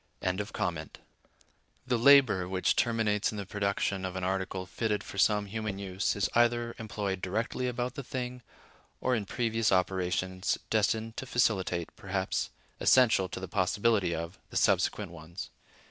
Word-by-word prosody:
(101) 90 -4 -2 1.0
The 125 -2 +1
labor(102) 120 -9 +6
which 95 -1 +1
terminates 110 -3 +1
in 105 - -6
the 100 - -4
production 100 -1 -1
of 95 -1 -4
an 95 - -3
article 95 0 -2
fitted 105 +1 -2
for 100 - -7
some 105 0 +3
human 105 -1 -4
use 95 0 -1
is 100 -1 +1
either 120 0 +2
employed 100 -3 -3
directly 115 +6 -1
about 125 0 -2
the 140 - -5
thing, 125 -1 -5 0.6
or 130 - +1
in 110 -4 0
previous 115 0 0
operations 95 0 0
destined 110 +1 +1
to 130 - -5
facilitate, 95 -8 0
perhaps 95 -1 -2 0.3
essential 115 -7 +5
to - - -5
the 95 - -5
possibility 95 0 +1
of, 85 +3 -6
the - - -3
subsequent - - +2
ones. 85 +2 -8
100 Hz, 145 wpm, -30 LUFS, 95-115 Hz, 1.0 s, labor(102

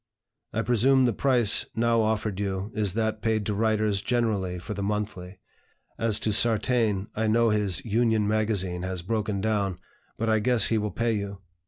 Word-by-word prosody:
I 115 +1 -2
presume 125 +4 +3
the 120 - +1
price 120 -3 +3
now 115 0 +2
offered 110 -2 -1
you 100 +1 -3
is 105 -4 -1
that 110 -1 -1
paid 110 -2 0
to 105 - -1
writers 110 -1 0
generally 105 -7 -1
for 100 +5 -6
the 100 - -5
'Monthly.' 100 -2 -4 0.6
As 110 -2 +1
to 110 - 0
Sartain, 110 -2 +2
I 110 +1 -1
know 115 +1 +3
his 105 -5 +1
'(Union) 110 -1 +1
Magazine' 105 -5 0
has 95 -1 -4
broken 105 0 -2
down, 100 -4 -1 0.4
but 115 - -2
I 110 -1 +2
guess 120 0 +3
he 110 - +1
will 105 0 -2
pay 115 +2 -1
you. 100 -1 -4
110 Hz, 175 wpm, -26 LUFS, 100-115 Hz, 0.6 s, presume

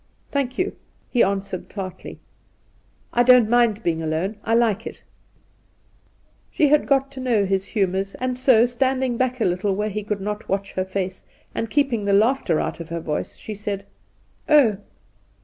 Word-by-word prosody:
'Thank, 265 -3 -1
you!' 370 +2 -1 0.4
he 245 - +3
answered 195 -1 -1
tartly; 190 -3 -7 1.0
'I 240 - +4
don't 250 -2 +6
mind 235 -2 +3
being 165 -1 0
alone. 165 +6 -2
I 225 - +1
like 225 -2 +1
it - - -10 0.7
!' - - -38
She 295 - +3
had 300 +1 +3
got 275 0 +2
to 270 - -9
know 235 -6 +1
his 195 0 0
humours, 195 -2 -1
and 255 0 -2
so, 255 -3 +5
standi 260 +2 0
ing 240 -2 -2
back 255 0 0
a - - +1
little 185 +2 0
where 210 +2 -1
he 210 +2 -3
could 210 0 -3
not 210 +2 -5
watch 195 0 -2
her 185 - -1
face, 190 -1 -4 0.3
and 225 - -3
keeping 255 -6 +1
the 200 - +2
laughter 210 - +3
out - - -3
of 165 0 -8
her 170 0 -3
voice, 155 -2 -4
she 215 - -7
said: 200 -1 -5 0.6
'Oh!' 270 -10 +5
215 Hz, 180 wpm, -22 LUFS, 195-250 Hz, 1.0 s, don't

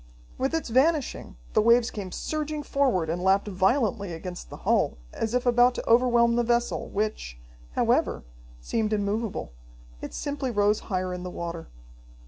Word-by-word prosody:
With 270 +5 0
its 325 - -2
vanishing, 275 - +1 0.2
the - - +4
waves 235 +1 +4
came 195 -3 -6
surging 305 +3 -3
forward, 260 - +1
and 170 +3 -2
lapped 195 +2 +3
violently 200 0 +1
against 175 +2 -7
the - - -9
hull, - - +2 0.2
as 225 +2 -2
if 250 - 0
about 245 0 +4
to - - -5
overwhelm 235 0 +4
the 240 - +3
vessel, 240 0 0
which, 205 - -3 0.4
however, - - +1 0.4
seemed 215 - -1
immovable. 205 - -2 0.5
It - - -7
simply 285 -2 -3
rose 205 -2 +2
higher 185 -2 -1
in 180 - -5
the 180 - -5
water. 170 -2 -6
225 Hz, 155 wpm, -26 LUFS, 185-245 Hz, 0.5 s, the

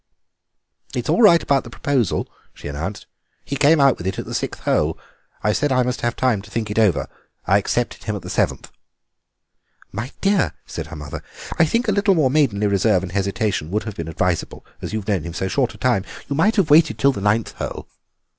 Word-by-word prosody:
"It's - - -3
all - - +3
right 170 -7 +7
about 140 -2 +2
the 115 - -10
proposal," 125 -4 0 0.3
she - - -9
announced; 80 +8 -5 0.4
"he 140 - -3
came 150 +3 +4
out 140 -2 +4
with 85 - -4
it 95 - -2
at - - -4
the - - -7
sixth - - -3
hole. - - +1 0.5
I 105 - +2
said 145 +4 0
I 130 -1 +3
must 125 0 -2
have 120 0 -1
time 120 -6 +1
to 105 - -14
think 110 -1 -3
it 105 - 0
over. 105 -6 +2 0.4
I 95 +2 +4
accepted 120 +4 -2
him 105 - -2
at 100 - -7
the 90 - -7
seventh." - - -1 1.2
"My 120 +6 -5
dear," 195 -2 +2
said - - -6
her - - -9
mother, 75 -2 -7 0.4
"I 165 - +7
think 230 +10 0
a - - +3
little 200 -1 +3
more 145 -6 +3
maidenly 125 -9 +2
reserve 100 -1 +2
and 90 - -5
hesitation 100 -3 -1
would 105 +4 -1
have 110 -2 -6
been 80 - -5
advisable, 85 +1 -2 0.2
as - - -5
you've 110 -2 -4
known 100 -5 +1
him 85 +1 -7
so 95 - -1
short 120 +1 0
a - - -13
time. 120 -4 +1 0.2
You 140 - -2
might 200 +9 +3
have 190 -8 +2
waited 160 +3 +5
till 140 - +4
the 115 - -5
ninth 105 +2 +1
hole." - - -6
110 Hz, 220 wpm, -21 LUFS, 95-140 Hz, 1.2 s, right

